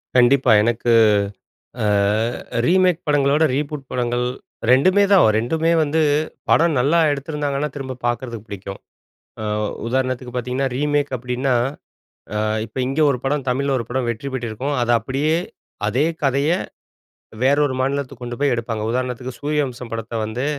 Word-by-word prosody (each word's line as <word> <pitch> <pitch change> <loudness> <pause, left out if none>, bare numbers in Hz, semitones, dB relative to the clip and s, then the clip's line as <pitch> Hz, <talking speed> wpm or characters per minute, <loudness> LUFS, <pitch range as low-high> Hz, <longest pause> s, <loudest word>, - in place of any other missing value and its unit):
கண்டிப்பா. 125 +1 +5
எனக்கு 120 +1 0 0.9
அ - - +1 0.8
ரீமேக் 180 0 +3
படங்கள 140 -2 +3
விட, 155 - +3
ரீபூட் 145 0 -3
படங்கள் 120 0 -1 0.5
2உமே 185 +10 +5
தான் 195 -2 +7
வ - - +5
2உமே 160 +9 +1
வந்து 155 +2 +1 0.5
படம் 165 -1 +4
நல்லா 150 +7 +3
எடுத்துருந்தாங்கன்னா, 145 0 -2
திரும்ப 130 -2 -5
பார்க்கறதுக்கு 120 -2 -4
பிடிக்கும். 100 0 -7 0.6
அ - - -4 0.4
உதாரணத்துக்கு 130 0 -2
பார்த்தீங்கன்னா 125 +2 -1
ரீமேக் 145 +1 0
அப்படின்னா, 125 +2 -1 0.8
அ - - 0 0.3
இப்ப 110 - -25
இங்க 135 +4 -1
ஒரு 125 - -1
படம் 140 -1 -1
தமிழ்ல 140 +2 0
ஒரு 115 - -4
படம் 125 -1 -1
வெற்றி 115 +5 -5
பெற்றிருக்கும். 125 +3 -3
அத 120 - 0
அப்படியே, 140 +7 0 0.5
அதே 135 +8 +1 0.2
கதையை 140 +6 +2 0.9
வேற 140 +2 +4
ஒரு 130 - -3
மாநிலத்துக்கு 135 -2 -2
கொண்டுபோய் 120 +3 0
எடுப்பாங்க. 115 -2 -3
உதாரணத்துக்கு, 125 +1 -3
சூரியவம்சம் 140 -5 -2
படத்த 115 0 -5
வந்து 110 +4 -3
130 Hz, 135 wpm, -21 LUFS, 120-145 Hz, 0.9 s, தான்